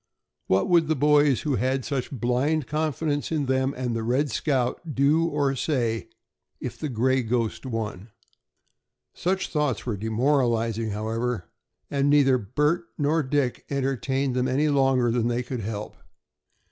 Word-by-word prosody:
What 95 +1 +2
would 170 -3 +4
the 160 - +1
boys 145 -1 +4
who 145 -5 0
had 130 0 0
such 135 -4 -2
blind 130 +5 0
confidence 150 0 -1
in 155 -3 0
them 130 0 +1
and 125 -2 -2
the 115 - -1
"Red 130 +6 0
Scout" 140 +2 -1
do 150 +5 +3
or 145 -4 0
say 120 -5 -1 0.5
if - - -5
the 155 - -3
"Gray 130 +2 +2
Ghost" 120 +1 -2
won? 110 -3 -4 1.0
Such 190 +2 -1
thoughts 150 -7 -1
were 115 -5 -2
demoralizing, 115 0 +1
however, 110 0 -3 0.4
and 140 0 +2
neither 135 -3 +4
Bert 150 - 0
nor 150 +2 +2
Dick 135 -2 -1
entertained 135 -1 -1
them 125 0 +1
any 140 +4 +1
longer 135 -4 +3
than 120 -1 +1
they 120 +1 0
could 125 -1 -5
help. 105 0 -5
130 Hz, 145 wpm, -25 LUFS, 120-145 Hz, 1.0 s, would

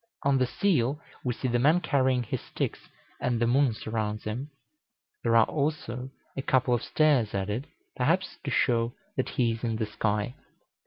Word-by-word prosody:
On 140 -1 +3
the 130 - +2
seal 145 -3 +1 0.2
we 125 -2 -1
see 130 - -2
the 120 0 +1
man 150 +7 +5
carrying 130 -6 +2
his - - -3
sticks, - - -4 0.3
and 120 -2 0
the 120 - +3
moon 125 0 +3
surrounds 110 -1 -3
him. 120 +7 -4 0.7
There 115 -1 +2
are 115 -1 +7
also 140 -4 -2 0.3
a 135 - -2
couple 130 -2 +2
of 120 - +1
stars 140 -11 +2
added, 105 +8 -2 0.3
perhaps 185 +5 +1
to 145 - -3
show 120 -2 +2 0.2
that 130 - -1
he 120 -2 +1
is 115 +1 -5
in 115 -2 0
the 110 0 -1
sky. 105 +1 -1
125 Hz, 175 wpm, -28 LUFS, 115-140 Hz, 0.7 s, are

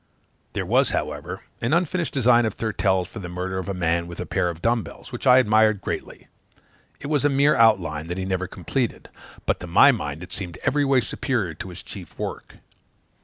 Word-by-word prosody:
There - - -2
was, - - +3
however, 75 +5 -3 0.2
an 120 +5 0
unfinished 170 -1 0
design 120 -3 +4
of 110 - -4
Thurtell's 95 -5 0
for 110 - -9
the 90 -4 -6
murder 90 +2 -3
of 95 - -5
a - - -1
man 85 -1 0
with 85 0 -9
a - - -3
pair 90 - 0
of 85 -2 -6
dumb 115 +5 +2
bells, - - -11
which 120 +2 -4
I 125 0 +8
admired 110 -3 +4
greatly; - - -6 0.7
it - - -9
was 145 -1 +1
a 145 - +4
mere 140 +2 +4
outline, 85 -9 +3
that 90 +1 -4
he 95 - -2
never 95 -1 -1
completed; 115 +8 -3 0.4
but - - 0
to - - -7
my - - +7
mind 75 +3 -4
it 90 - -10
seemed 90 -5 -5
every 145 +1 +2
way 135 -2 +4
superior 115 - -2
to 95 - -8
his 90 0 -9
chief 95 -6 -10
work. - - -6
100 Hz, 210 wpm, -24 LUFS, 90-125 Hz, 0.7 s, I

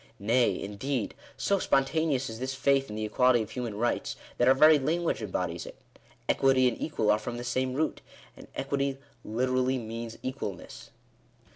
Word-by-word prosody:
Nay, 115 +5 +2
indeed, 110 +4 -3 0.2
so 200 -1 +1
spontaneous 135 -2 +1
is 110 0 -7
this 130 +1 -3
faith 135 0 +2
in 105 - -6
the 110 0 -2
equality 120 +2 +3
of - - -11
human 120 -4 -4
rights, 120 +3 -1 0.2
that 120 - +4
our 130 - +7
very 155 +2 +7
lan 160 +6 0
guage 165 - 0
embodies 90 -4 -3
it. - - -10 0.5
Equity 135 -1 +4
and 120 - -2
equal 110 -9 +1
are 105 - +3
from 120 +2 -5
the 120 - -5
same 130 +1 -1
root; 155 +3 -1 0.3
and - - -13
equity 140 0 -1 0.3
literally 130 +3 0
means 115 0 -6
equalness. 130 -8 -6
130 Hz, 170 wpm, -29 LUFS, 110-135 Hz, 0.5 s, our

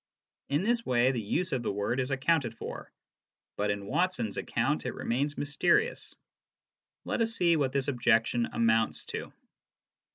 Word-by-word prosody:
In 145 +5 +1
this 235 +2 +1
way 125 - +3
the 120 -3 -2
use 170 - -1
of 130 - 0
the 120 - -1
word 105 +5 -1
is 130 0 -1
accounted 135 -3 +1
for; - - -7 0.6
but 105 0 -1
in 100 -1 -2
Watson's 160 - 0
account 135 +6 -1
it 125 - -4
remains 140 +5 -1
mysterious. 420 - +1 0.9
Let - - -1
us 225 0 +2
see 170 -4 +3
what 140 -4 +1
this 135 -1 0
objection 120 -2 +2
amounts 115 -1 +1
to. - - -6
130 Hz, 155 wpm, -29 LUFS, 115-160 Hz, 0.9 s, way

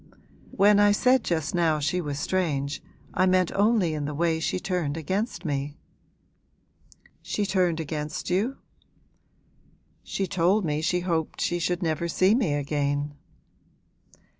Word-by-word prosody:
'When 205 +1 +4
I 205 0 +5
said 255 +3 +3
just 160 -3 -1
now 165 -3 +2
she 150 +5 0
was 145 -3 -4
strange, 145 -4 -1 0.3
I 185 +1 +3
meant 185 -1 +3
only 205 -5 +2
in 150 -1 -3
the 150 0 -4
way 165 +1 +1
she 160 - -1
turned 175 -6 -2
against 190 - -3
me.' 145 0 -3 1.4
'She 205 - -2
turned 180 -4 +1
against 150 -1 -4
you?' 210 +9 0 1.5
'She 195 - -2
told 185 +3 +2
me 150 -1 -1
she 180 +2 0
hoped 165 -3 -2
she 175 - 0
should 175 +1 -1
never 160 +1 -1
see 185 +4 +3
me 220 - +1
again.' 145 0 -1
170 Hz, 140 wpm, -26 LUFS, 150-190 Hz, 1.5 s, I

